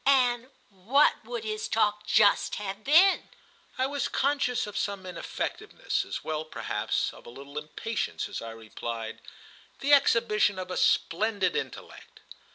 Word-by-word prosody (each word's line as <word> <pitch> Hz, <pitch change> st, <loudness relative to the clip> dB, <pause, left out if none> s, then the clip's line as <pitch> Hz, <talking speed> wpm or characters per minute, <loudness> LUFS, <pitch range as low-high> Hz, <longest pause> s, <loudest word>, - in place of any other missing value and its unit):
"And 250 Hz, -2 st, +3 dB, 0.2 s
what 215 Hz, +10 st, +2 dB
would 475 Hz, -3 st, -5 dB
his 430 Hz, 0 st, -3 dB
talk 210 Hz, -1 st, +1 dB
just 205 Hz, -2 st, +4 dB
have 200 Hz, 0 st, -5 dB
been?" 350 Hz, -, +5 dB, 0.5 s
I 260 Hz, -, +2 dB
was 285 Hz, +1 st, -1 dB
conscious 275 Hz, -4 st, +1 dB
of 210 Hz, -1 st, -8 dB
some 200 Hz, -1 st, -2 dB
ineffectiveness, 180 Hz, -2 st, -3 dB
as -, -, -5 dB
well 155 Hz, 0 st, -2 dB
perhaps 155 Hz, -, -2 dB
as -, -, -12 dB
of -, -, -17 dB
a -, -, -8 dB
little 140 Hz, +4 st, -7 dB
impatience, 210 Hz, +9 st, -3 dB
as -, -, -6 dB
I 115 Hz, -, -6 dB
replied: 115 Hz, 0 st, -6 dB, 0.6 s
"The 285 Hz, +1 st, +3 dB
exhibition 230 Hz, -7 st, +4 dB
of 185 Hz, 0 st, -5 dB
a -, -, -2 dB
splendid 205 Hz, +2 st, +2 dB
intellect." 450 Hz, -, -6 dB
210 Hz, 150 wpm, -28 LUFS, 180-270 Hz, 0.6 s, been